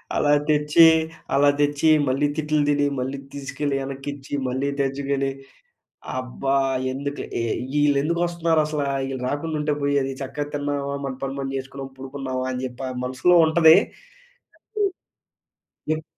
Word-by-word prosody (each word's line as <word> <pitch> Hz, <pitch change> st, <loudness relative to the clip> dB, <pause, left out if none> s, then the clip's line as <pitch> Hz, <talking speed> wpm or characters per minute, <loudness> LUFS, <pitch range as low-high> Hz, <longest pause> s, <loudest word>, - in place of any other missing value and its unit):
అలా 145 Hz, -, +2 dB, 0.2 s
తెచ్చి, 150 Hz, +2 st, +5 dB, 0.5 s
అలా 145 Hz, +1 st, +5 dB
తెచ్చి 145 Hz, +1 st, +2 dB, 0.2 s
మళ్ళీ 135 Hz, +3 st, +2 dB
తిట్లు 155 Hz, -1 st, +1 dB
తిని, 145 Hz, 0 st, +2 dB
మళ్ళీ 130 Hz, +2 st, -3 dB, 0.2 s
తీసుకెళ్ళి 140 Hz, +1 st, -3 dB
వెనక్కిచ్చి, 135 Hz, +1 st, -7 dB, 0.2 s
మళ్ళీ 130 Hz, +2 st, -1 dB
తెచ్చుకుని 140 Hz, 0 st, 0 dB, 0.9 s
అబ్బా! 130 Hz, +2 st, -2 dB, 0.4 s
ఎందుకు, 140 Hz, +2 st, -4 dB, 0.5 s
వీళ్ళెందుకొస్తున్నారసల? 155 Hz, +1 st, +1 dB, 0.3 s
ఈళ్ళు 135 Hz, -1 st, -4 dB
రాకుండుంటే 150 Hz, +1 st, -1 dB
పోయేది! 140 Hz, -1 st, +1 dB
చక్కగా 135 Hz, +2 st, -4 dB
తిన్నావా, 145 Hz, -1 st, -2 dB
మన 135 Hz, -, -3 dB
పని 135 Hz, 0 st, -3 dB
మనం 135 Hz, 0 st, -3 dB
చేసుకున్నాం, 135 Hz, 0 st, -7 dB
పడుకున్నావా 130 Hz, -1 st, -4 dB
అని 125 Hz, 0 st, -4 dB
చెప్పి 130 Hz, +1 st, -5 dB
మనసులో 130 Hz, +8 st, +2 dB
ఉంటది. 160 Hz, 0 st, +7 dB, 1.0 s
కాన్ని 400 Hz, -3 st, -2 dB, 0.9 s
ఎప్ 155 Hz, -, -8 dB
140 Hz, 115 wpm, -23 LUFS, 135-150 Hz, 1.0 s, ఉంటది